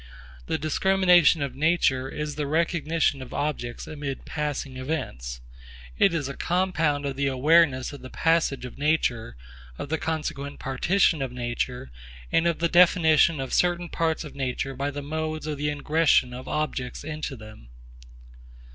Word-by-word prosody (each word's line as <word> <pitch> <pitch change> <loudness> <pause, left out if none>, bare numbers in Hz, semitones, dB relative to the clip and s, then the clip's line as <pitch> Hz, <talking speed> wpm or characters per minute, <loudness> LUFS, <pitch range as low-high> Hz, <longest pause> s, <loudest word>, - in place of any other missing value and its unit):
The - - 0
discrimination 175 0 +4
of 140 -3 -4
nature 140 -3 +1
is 150 +1 -4
the 150 -1 -3
recognition 160 -2 0
of 130 - -8
objects 130 -5 -3
amid 145 -3 -6
passing 145 -3 -3
events. 60 - -4 0.5
It 195 - +4
is 160 -5 -2
a 140 - -6
compound 165 -5 0
of 140 -1 -2
the 140 +1 0
awareness 135 0 +3
of 145 - -10
the 130 - -9
passage 165 -5 +1
of 125 - -10
nature, 125 - 0 0.4
of 145 - -6
the 160 - -1
consequent 150 -3 -3
partition 160 +4 +1
of 135 -2 -2
nature, 125 - -4 0.4
and 165 +1 +3
of 170 - +1
the 170 - +1
definition 165 -3 +5
of 135 -1 -4
certain 175 -1 +1
parts 165 -1 -1
of 150 - -9
nature 135 0 -3
by 140 +2 -2
the 145 0 -6
modes 155 +1 -3
of 150 -2 -4
the 150 - -1
ingression 145 -3 +2
of 125 +1 -8
objects 135 -5 -3
into 155 -2 -5
them. 110 - -13
150 Hz, 155 wpm, -25 LUFS, 130-160 Hz, 0.5 s, definition